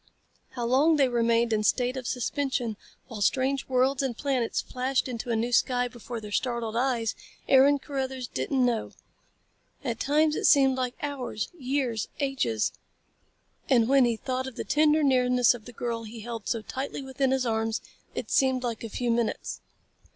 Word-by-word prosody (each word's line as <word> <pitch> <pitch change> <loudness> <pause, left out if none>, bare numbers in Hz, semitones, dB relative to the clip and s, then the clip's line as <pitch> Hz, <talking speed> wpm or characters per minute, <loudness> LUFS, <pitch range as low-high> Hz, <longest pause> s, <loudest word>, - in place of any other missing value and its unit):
How 240 -2 -3
long 280 +7 +4
they 280 -3 +4
remained 235 -1 +2
in 215 -1 +1
state 250 +4 +1
of 255 -2 -5
suspension 250 -2 -1 0.3
while 225 -4 -7
strange 265 +5 +1
worlds 260 +1 +2
and 260 -4 -2
planets 260 -5 0
flashed 260 +1 -1
into 240 -1 -5
a 230 - +1
new 235 +2 -1
sky 245 0 +2
before 240 -1 -7
their 210 -1 -9
startled 235 -1 -1
eyes, 240 -2 0 0.3
Aaron 275 +2 +6
Carruthers 265 -2 -4
didn't 265 0 0
know. 235 -3 -1 0.9
At 235 -4 -3
times 305 +2 +2
it - - -1
seemed 270 -2 +5
like 255 -1 -2
hours, 265 -7 -3
years, 260 -6 -1
ages. 265 - 0 1.0
And 235 -4 +4
when 270 -1 +5
he 235 -1 +1
thought 260 +2 -3
of 260 - -8
the - - -4
tender 305 0 +3
nearness 250 -3 +4
of 230 -3 -10
the 245 - -9
girl 235 0 -3
he 220 +1 -9
held 230 -1 -6
so 225 -2 -1
tightly 270 +3 -5
within 265 0 -1
his 265 -1 +1
arms, 225 -1 0 0.4
it - - -4
seemed 260 -1 +2
like 235 -2 -3
a 230 - -5
few 240 +3 -1
minutes. 230 -1 -2
250 Hz, 175 wpm, -27 LUFS, 235-270 Hz, 1.0 s, Aaron